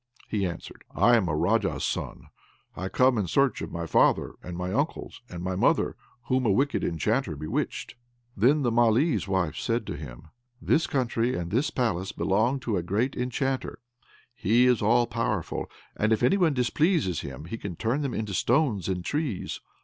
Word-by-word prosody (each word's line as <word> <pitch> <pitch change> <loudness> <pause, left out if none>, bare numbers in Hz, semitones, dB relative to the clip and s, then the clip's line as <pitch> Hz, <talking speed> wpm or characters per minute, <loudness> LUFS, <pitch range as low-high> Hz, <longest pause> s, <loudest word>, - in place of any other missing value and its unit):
He 100 -3 0
answered, 85 - -8
"I 120 - +5
am 100 -7 +2
a 75 - 0
Raja's 75 - +1
son, - - -4 0.5
and 90 - -5
I - - -3
come 125 0 +3
in 100 - -1
search 140 +9 +2
of - - -5
my 85 0 -4
father, - - +3
and 90 -1 -7
my 90 +1 -3
uncles, 145 +7 -2
and 85 -1 -7
my 95 0 -2
mother 95 - +2 0.3
whom 130 +1 0
a - - +4
wicked 140 +8 +1
enchanter 95 - 0
bewitched." 75 +2 -3 0.4
Then 135 +8 +3
the 120 - +2
Malee's 120 +5 +3
wife 95 -5 0
said, 115 -1 -1 0.7
"This 155 - +2
country 125 -2 0
and 85 -1 -4
this 125 +8 +1
palace 100 -6 -1
belong 115 +8 +1
to 110 -4 -1
a - - 0
great 105 +10 -1
enchanter; 130 +2 -2 0.6
he 120 +3 +3
is 125 -3 +3
all 120 +3 +4
powerful, 115 -6 -2 0.3
and 110 +1 +1
if 110 +1 +2
any 125 - +4
one 170 -7 +2
displeases 125 - +1
him, 70 +2 -8
he 110 +6 -6
can 95 -4 -5
turn 115 - -1
them 140 -3 -2
into 105 -2 -3
stones 120 - +1
and 90 -2 -2
trees. 145 - -2
115 Hz, 180 wpm, -27 LUFS, 95-130 Hz, 0.7 s, I